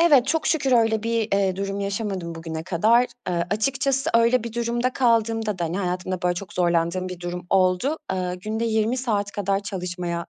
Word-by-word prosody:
Evet, 290 -7 +6
çok 315 +2 0
şükür 275 -5 +1
öyle 225 -3 +3
bir, 230 -1 0
eee, 195 -2 +2
durum 195 0 -3
yaşamadım 195 -4 -3
bugüne 165 -1 -5
kadar. 220 +8 +3 0.2
Aaa, 175 -1 0
açıkçası 270 +6 0
öyle 235 +1 +4
bir 235 - -5
durumda 240 +2 -1
kaldığımda 225 -4 +1
da, 170 - 0
hani, 170 +4 -2
hayatımda 185 -1 -2
böyle 180 0 +2
çok 180 +1 -7
zorlandığım 175 +1 +1
bir 180 -1 -8
durum 175 0 -5
oldu. 190 - +2
Aaa, 180 -1 -2
günde 215 +5 -3
20 220 +1 +1
saat 210 -6 -1
kadar 200 -1 -1
çalışmaya 180 -3 -4
200 Hz, 180 wpm, -24 LUFS, 180-230 Hz, 0.2 s, Evet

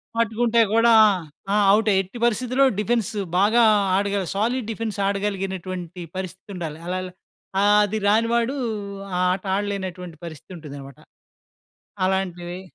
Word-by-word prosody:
పట్టుకుంటే 230 +1 +1
గూడా 230 +1 +4 0.6
ఆ! - - +3 0.2
ఔటే. 215 0 +2
ఎట్టి 195 +6 -10
పరిస్థితిలో 250 +3 +1 0.2
డిఫెన్స్ 225 -1 0 0.3
బాగా 220 +5 +4 0.3
ఆడగల 200 0 0
సాలిడ్ 230 +3 0
డిఫెన్స్ 220 -1 -4
ఆడగలిగినటువంటి 190 -3 -3 0.2
పరిస్థితుండాలి 180 -3 -6
అలల. 185 +1 -2 0.6
ఆహ్, 205 +1 +5
అది 215 +2 -3
రాని 225 +3 +3
వాడు 235 +3 +1 0.6
ఆ - - 0
ఆట 185 +1 -5
ఆడలేనటువంటి 185 -4 -4
పరిస్థితుంటుందనమాట. 150 -4 -10 1.1
అలాంటివి 180 -2 -2
200 Hz, 110 wpm, -23 LUFS, 180-225 Hz, 1.1 s, ఆహ్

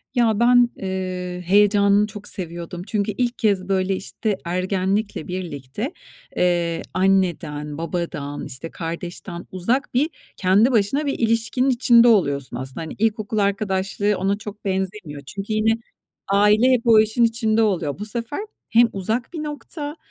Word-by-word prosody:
Ya, 225 -4 +3
ben, 245 0 +5
eee, 185 -1 -4
heyecanını 205 +1 +4
çok 205 0 -9
seviyordum. 175 -1 -6
Çünkü 210 0 0
ilk 240 +3 -1
kez, 200 -3 +1
böyle, 190 0 +1
işte, 205 +1 -3
ergenlikle 185 +2 -1
birlikte, 180 - -5 0.4
eee, 175 -2 +1
anneden, 175 -6 0
babadan, 165 -4 -4
işte, 145 +4 -7
kardeşten 170 +1 -6
uzak 230 +9 -1
bir 280 +6 +2 0.3
kendi 200 +7 +4
başına 240 +6 +1
bir 280 - -2
ilişkinin 230 +3 +1
içinde 240 -1 +5
oluyorsun 140 - +2
aslında. 130 +4 -6
Hani, 160 - -6
ilkokul 215 0 0
arkadaşlığı 200 0 0
ona 195 +2 0
çok 210 0 -9
benzemiyor. 190 -6 -3
Çünkü 195 +8 -5
yine 215 +1 +3 0.6
aile 210 +5 +4
hep 250 -2 +3
o 225 -2 +7
işin 220 +2 +2
içinde 225 -1 +2
oluyor. 175 -9 0
Bu 210 - -4
sefer 230 - -4 0.3
hem 235 +1 +6
uzak 220 - -2
bir 320 -3 -4
nokta, 295 0 -6
200 Hz, 140 wpm, -22 LUFS, 180-225 Hz, 0.6 s, o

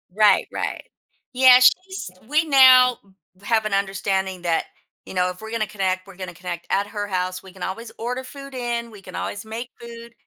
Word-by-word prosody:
Right, 215 -1 +4
right. - - -3 0.5
Yeah, 255 0 +7
she’s 365 - +2 0.2
we 305 +3 +2
now, 255 -3 +7
mm, 190 0 -28
have 220 0 +1
an 210 - -2
understanding 195 -1 -1
that, 165 -2 0 0.4
you - - -9
know, 180 0 +1
if 180 +3 -9
we're 220 - -8
gonna 225 -2 -1
connect 190 -2 -2
we're 195 - -13
gonna 185 -1 -7
connect 175 0 -7
at 200 +1 +1
her 205 -1 -4
house, 185 -1 -3
we 190 - -13
can 185 - -9
always 225 +5 -5
order 250 +3 -4
food 275 +1 -11
in, 235 -1 -3
we 205 - -13
can 185 -1 -11
always 205 - -5
make 230 +3 -6
food, 235 0 -11
215 Hz, 200 wpm, -22 LUFS, 190-245 Hz, 0.5 s, Yeah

